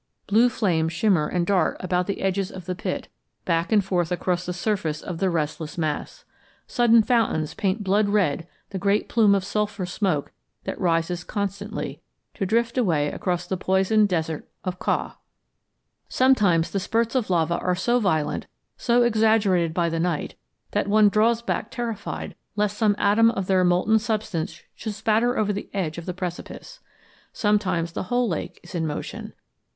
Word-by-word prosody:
Blue 225 +4 +4
flames 165 -9 0
shimmer 180 -5 +2
and 175 -2 0
dart 185 -4 +1
about 180 -1 0
the 200 - -3
edges 195 0 0
of 185 -2 -9
the 185 - -2
pit, 180 - -4 0.4
back 170 +2 0
and 205 -3 +4
forth 180 -3 0
across 180 0 -1
the - - -1
surface 175 -4 -1
of 175 -3 -5
the 190 - +2
restless 155 -1 -3
mass. 155 -3 -3 0.4
Sudden 235 -2 +4
fountains 215 -10 +1
paint 200 +2 -1
blood 200 +2 +2
red 175 -6 +1 0.2
the 190 - -3
great 200 +2 +1
plume 210 -4 +4
of 195 - 0
sulphur 205 -1 -2
smoke 180 -5 -1 0.3
that - - -5
rises 170 0 0
constantly, 205 +1 -4 0.3
to 195 - -2
drift 235 +4 +1
away 160 -10 +2
across 180 -1 -2
the 185 +1 -2
poisoned 190 +3 +2
desert 160 -3 -2
of 185 -1 -4
Kau. - - -1 1.0
Sometimes 205 -11 +3
the 200 - 0
spurts 225 +4 0
of 250 -6 0
lava 170 -1 +1
are 180 0 0
so 240 +7 +1
violent, 160 -9 0 0.3
so 240 0 +3
exaggerated 215 -7 +3
by 170 +1 0
the 165 0 -1
night, 165 -3 -1 0.4
that - - 0
one 210 0 +5
draws 225 +3 +2
back 215 - -2
terrified 235 -3 -4 0.2
lest 210 0 0
some 210 -2 +2
atom 220 +3 +4
of 195 -5 -2
their 185 -1 +3
molten 180 +5 +3
substance 210 -7 -3
should 215 -2 -6
spatter 225 +3 +1
over 210 -1 +1
the 200 - -6
edge 170 -4 -2
of 170 - -10
the 180 - -2
precipice. 185 - -7 0.5
Sometimes 195 -6 0
the - - -4
whole 245 0 +2
lake 170 -6 -4
is 175 - -13
in 165 -2 -1
motion. 150 - -6
195 Hz, 170 wpm, -24 LUFS, 175-215 Hz, 1.0 s, one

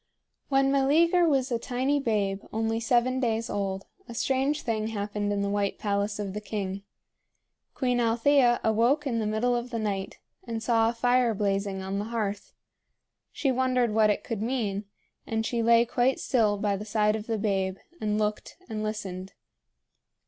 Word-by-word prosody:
When 270 -1 +3
Meleager 330 +6 +4
was 270 -3 +1
a 235 - 0
tiny 260 +4 0
babe 205 -6 0
only 225 +1 -1
seven 245 +2 +2
days 230 -2 -1
old, 195 -1 -2 0.2
a 235 - -7
strange 270 +4 0
thing 220 -2 -1
happened 205 -1 -2
in 200 0 0
the - - 0
white 200 0 -1
palace 205 0 -1
of 200 -2 -4
the 210 - -4
king. 200 -2 -4 0.9
Queen 250 -2 +1
Althea 240 +2 +3
awoke 235 +7 +2
in 235 -4 0
the 215 - -1
middle 225 +3 +1
of 240 +1 -3
the 235 - -3
night, 200 -3 -3 0.3
and 225 -1 -5
saw 225 -1 +3
a - - -2
fire 245 -1 +2
blazing 195 -1 -1
on 195 +1 -3
the 205 - -3
hearth. 215 -3 -3 0.8
She 275 - 0
wondered 255 -3 +1
what 215 -1 +4
it 210 - 0
could 230 -4 -4
mean; 215 -4 -1 0.4
and 225 0 -1
she 235 0 -1
lay 230 +1 +5
quite 245 +2 +1
still 220 -5 +2
by 205 0 0
the 200 - -5
side 210 0 +2
of 215 0 -6
the 225 -1 -1
babe, 195 -3 -1 0.2
and 210 -1 0
looked 210 0 -2
and 220 -2 -4
listened. 195 -3 -5
225 Hz, 175 wpm, -27 LUFS, 205-245 Hz, 0.9 s, lay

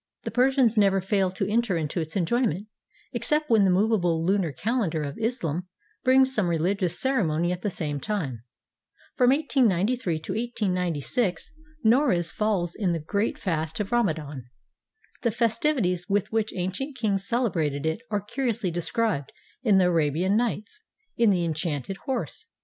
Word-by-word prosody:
The - - -4
Persians 250 -2 +3
never 195 -1 +4
fail 195 0 +1
to 190 +1 -3
enter 215 -3 +1
into 160 +2 -2
its 160 0 -6
enjoyment, 200 0 0 0.5
except 300 -2 0
when 215 -3 +5
the - - +4
movable 180 -4 +2
lunar 190 -3 +1
calendar 185 - -1
of 140 -1 -5
Islam 180 - -2 0.4
brings 260 +1 +4
some 210 -7 +1
reHgious 175 +2 0
ceremony 175 - +1
at 180 0 -3
the 210 - -1
same 150 -5 -3
time. 150 - -3 0.7
From 250 -2 +4
1893 245 - +2
to - - -6
1896 185 - -1 0.3
Noruz 220 - +3
falls 195 -5 0
in 190 -5 0
the 165 - -1
great 200 +8 -1
fast 160 -3 -2
of 205 -2 -3
Rama 235 -9 +2
dan. 145 -5 -8 0.7
The 235 - +2
festivities 225 - 0
with 200 -1 0
which 220 -1 0
ancient 200 +10 -3
kings 200 -4 -1
celebrated 165 - 0
it 160 +7 -1
are 205 -1 0
curiously 225 -3 -2
described 175 - -1 0.3
in 215 -6 +4
the 185 - +5
"Arabian 170 +3 +2
Nights," 230 - -2 0.3
in 235 -2 +4
''The 180 -3 +2
Enchanted 160 +2 -3
Horse." 265 - -3
195 Hz, 150 wpm, -26 LUFS, 170-230 Hz, 0.7 s, when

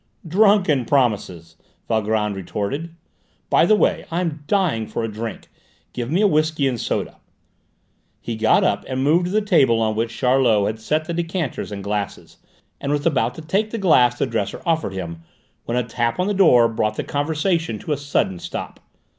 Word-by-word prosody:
"Drunken 185 - +3
promises!" 100 - 0 0.3
Valgrand 110 -2 0
retorted. 135 - -4 0.6
"By 170 - +5
the 215 - +5
way, - - +1
I 170 +2 -1
am 155 -4 -3
dying 160 - +1
for - - -3
a - - -1
drink. 110 +1 -6 0.5
Give 120 -1 -4
me 175 +7 +1
a 210 - +5
whisky 155 -4 +1
and 125 -3 -2
soda." - - -3 1.0
He 115 - -5
got 110 0 +3
up 100 - +1
and 130 0 -2
moved 165 +5 +3
to 180 - -3
the 215 +1 +1
table 135 - +3
on 110 -1 0
which 115 +1 -2
Charlot 125 -5 +3
had 110 +1 -3
set 155 +8 -1
decanters 170 - -3
and 100 -1 -6
glasses, 100 -1 -4 0.4
and 140 - -3
was 145 0 -1
about 125 -7 +1
to - - -8
take 195 +7 0
the 230 - -4
glass 125 - +4
the - - +1
dresser 115 -5 -3
offered 160 - 0
him 85 -3 -6 0.4
when 120 - -2
a 125 - +1
tap 115 +2 -2
on 180 - +2
the 205 - 0
door 140 -12 +5
brought 110 -1 -1
the - - -3
conversation 155 - -1
to 150 - -6
a - - +2
sudden 140 -10 -1
stop. - - -6
130 Hz, 185 wpm, -21 LUFS, 110-165 Hz, 1.0 s, By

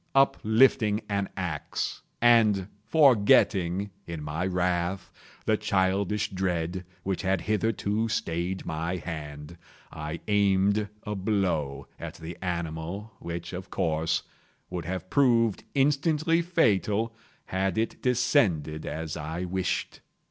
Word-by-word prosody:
Uplifting 110 -4 +4
an 100 -1 -1
axe, - - -3 0.2
and 110 -5 +5 0.2
forgetting, 100 - +4 0.2
in 85 -3 -5
my 80 +5 -2
wrath, 90 0 -1 0.3
the - - +3
childish 100 +2 +1
dread 90 -1 -1 0.2
which 95 -1 -1
had 95 -2 +1
hitherto 110 0 0
stayed 85 0 -2
my 80 +3 -2
hand, 80 -1 -7 0.3
I 75 +2 -5
aimed 100 0 +3
a 105 - -3
blow 95 -8 -1
at - - -6
the 80 +1 -7
animal 85 +3 -4
which, 85 +1 -6
of 90 +1 -6
course, 80 -4 0 0.5
would 90 -3 -4
have 95 +1 -5
proved 115 -7 +3
instantly 150 +4 +2
fatal 115 - +2 0.3
had 95 -1 -1
it 110 +1 -1
descended 95 - +2
as 80 -1 -4
I 80 +4 -4
wished. 95 +1 -2
95 Hz, 110 wpm, -27 LUFS, 85-110 Hz, 0.5 s, and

